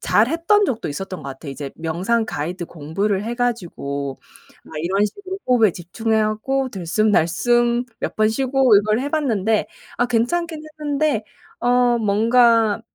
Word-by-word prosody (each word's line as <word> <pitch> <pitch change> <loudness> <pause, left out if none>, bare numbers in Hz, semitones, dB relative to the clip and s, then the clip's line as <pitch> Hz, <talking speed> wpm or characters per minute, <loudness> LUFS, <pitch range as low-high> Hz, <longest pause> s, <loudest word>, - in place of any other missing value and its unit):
잘했던 335 - +3
적도 230 - -2
있었던 185 +2 -6
것 140 - -6
같아요. 135 +2 -8
이제 140 -1 -6
명상 180 +8 0
가이드 170 +4 -4
공부를 190 +6 -2
해 235 +1 -3
가지고 165 - -3 0.4
막 - - -14
이런 195 +5 +1
식으로 385 - -7
호흡에 225 -7 +4
집중해 220 +5 -1
갖고 260 +5 -1
들숨 195 +4 0
날숨 240 +8 +2 0.2
몇 - - -3
번 215 0 +3
쉬고 260 -1 +3
이걸 215 +3 +2
해 280 - -2
봤는데 225 -9 +1 0.3
아 245 - +3
괜찮기는 310 +7 -1 0.2
했는데 290 -6 0 0.4
어 245 -1 +3
뭔가 225 +1 +3
220 Hz, 300 characters per minute, -21 LUFS, 185-250 Hz, 0.4 s, 호흡에